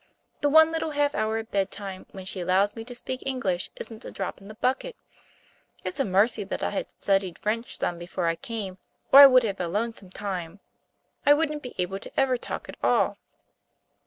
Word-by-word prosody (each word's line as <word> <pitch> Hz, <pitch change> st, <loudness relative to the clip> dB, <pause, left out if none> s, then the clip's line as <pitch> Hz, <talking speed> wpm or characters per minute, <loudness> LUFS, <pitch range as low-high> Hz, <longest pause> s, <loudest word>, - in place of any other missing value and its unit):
The 290 Hz, -, +3 dB
one 320 Hz, +2 st, +7 dB
little 325 Hz, -1 st, -1 dB
half 290 Hz, 0 st, +2 dB
hour 215 Hz, +1 st, 0 dB
at 225 Hz, 0 st, -6 dB
bedtime 195 Hz, -1 st, -3 dB
when 190 Hz, -1 st, -10 dB
she 190 Hz, -, -5 dB
allows 190 Hz, +3 st, +2 dB
me 225 Hz, -, -6 dB
to 245 Hz, 0 st, -8 dB
speak 255 Hz, +1 st, -4 dB
English 205 Hz, -10 st, -1 dB
isn't 225 Hz, -1 st, -8 dB
a -, -, -7 dB
drop 195 Hz, 0 st, -5 dB
in 195 Hz, -, -13 dB
the 215 Hz, -, -10 dB
bucket. 265 Hz, -, -1 dB, 0.9 s
It's 185 Hz, 0 st, -4 dB
a -, -, +2 dB
mercy 205 Hz, +3 st, +3 dB
that 195 Hz, -, -4 dB
I -, -, 0 dB
had 200 Hz, -, -3 dB
studied 195 Hz, -3 st, +1 dB
French 230 Hz, +3 st, -2 dB
some 175 Hz, -1 st, -2 dB
before 175 Hz, +1 st, -3 dB
I 165 Hz, 0 st, +2 dB
came, 195 Hz, -3 st, -5 dB, 0.3 s
or 275 Hz, -, +12 dB
I 280 Hz, -, +13 dB
would 255 Hz, -2 st, +6 dB
have 200 Hz, -4 st, -2 dB
a 175 Hz, -, -1 dB
lonesome 210 Hz, +1 st, -3 dB
time. 185 Hz, -2 st, -5 dB, 0.6 s
I 290 Hz, -, +7 dB
wouldn't 300 Hz, -1 st, -1 dB
be 250 Hz, -, -9 dB
able 190 Hz, +1 st, -2 dB
to -, -, -5 dB
ever 265 Hz, -2 st, +3 dB
talk -, -, -6 dB
at -, -, -9 dB
all." -, -, +2 dB
210 Hz, 205 wpm, -26 LUFS, 190-255 Hz, 0.9 s, I